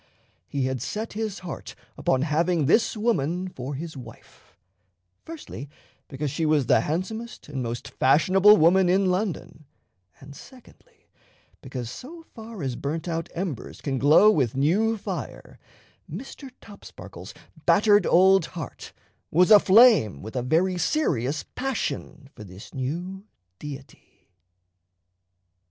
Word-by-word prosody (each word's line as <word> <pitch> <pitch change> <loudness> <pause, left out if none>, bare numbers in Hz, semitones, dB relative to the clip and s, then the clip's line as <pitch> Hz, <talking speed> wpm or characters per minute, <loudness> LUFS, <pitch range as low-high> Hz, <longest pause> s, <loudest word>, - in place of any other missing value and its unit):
He 140 -2 -2
had 130 -2 -3
set 215 - -5
his 215 -1 -4
heart 170 - -7 0.2
upon 130 0 0
having 160 +1 +1
this 220 - +2
woman 185 -5 -1
for 135 -5 -7
his 160 +3 -7
wife 120 -4 -14 0.7
firstly, 310 - -9 0.4
because 145 0 -4
she 165 - -3
was 155 -3 +2
the - - +4
handsomest 220 +9 -5
and 140 -3 -5
most 120 -1 -5
fashionable 185 +9 +4
woman 180 +2 +4
in 190 0 +2
London, 180 -5 -4 0.5
and 140 +1 -13
secondly, 430 - -18 0.5
because 130 -3 -6
so 325 - -10
far 225 - -9
as 130 -3 -3
burnt 155 +7 -4
out 165 0 -3
embers 170 - -5
can 135 -3 -3
glow 155 +10 +6
with 130 - 0
new 205 +11 +2
fire, - - -7 0.5
Mr. 270 0 -8
Topsparkle's 100 - -12 0.3
battered 205 +2 +4
old 190 +2 +5
heart 145 -8 -8 0.4
was 180 +6 +3
aflame 205 - +6
with 110 +4 -9
a 125 - 0
very 175 +8 +1
serious 155 - 0
passion 250 - -4
for 110 - -11
this 95 0 -13
new 175 +9 -5 0.4
deity. 145 -2 -12
165 Hz, 125 wpm, -25 LUFS, 135-205 Hz, 0.7 s, glow